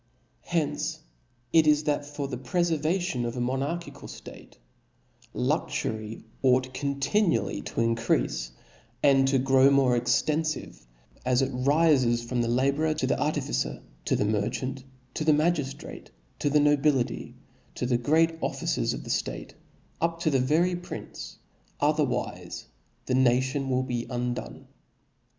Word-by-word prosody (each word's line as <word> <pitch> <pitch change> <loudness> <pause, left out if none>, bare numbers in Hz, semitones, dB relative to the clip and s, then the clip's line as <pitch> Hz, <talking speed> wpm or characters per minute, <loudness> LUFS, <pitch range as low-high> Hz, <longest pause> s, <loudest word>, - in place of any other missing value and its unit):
Hence 165 -4 -1 0.5
it 160 -2 +6
is, 150 0 +4
that 145 -1 0
for 145 -1 -4
the 130 - -4
prefervation 165 +2 0
of 120 +1 -3
a - - -2
mo 120 +1 0
narchical 165 +6 -4
ftate, - - -11 0.8
luxury 110 0 -2 0.2
ought 130 0 +3
continually 140 - 0
to - - -3
in 115 0 +2
creafe, - - 0 0.5
and 135 -1 +5
to 135 0 +3
grow 135 +1 +5
more 135 -3 +4
extenfive, 130 - -1 0.4
as 125 +1 +2
it 135 - -1
rifcs 130 -3 +3
from 120 0 0
the 115 - 0
labourer 140 +6 +1
to - - -1
the - - 0
artificer, - - -1 0.2
to - - +2
the - - +1
merchant, 125 +6 -2 0.3
to - - -2
the 155 0 +5
magiftrate, 150 -3 -1 0.3
to 145 - +1
the 150 +1 +4
nobility, 145 -3 +1 0.4
to - - -2
the 120 -1 +1
great 160 +5 +2
officers - - -1
of - - -6
ftate, - - -3 0.5
up 165 0 0
to 155 - +2
the 135 - +3
very 160 +8 +2
prince; 175 0 -8 0.4
ocherwife 150 -2 -1 0.4
the 125 - -1
nation 130 +2 +2
will 130 0 +1
be 120 -2 -3
undone. 125 -1 -4
135 Hz, 135 wpm, -27 LUFS, 125-155 Hz, 0.8 s, it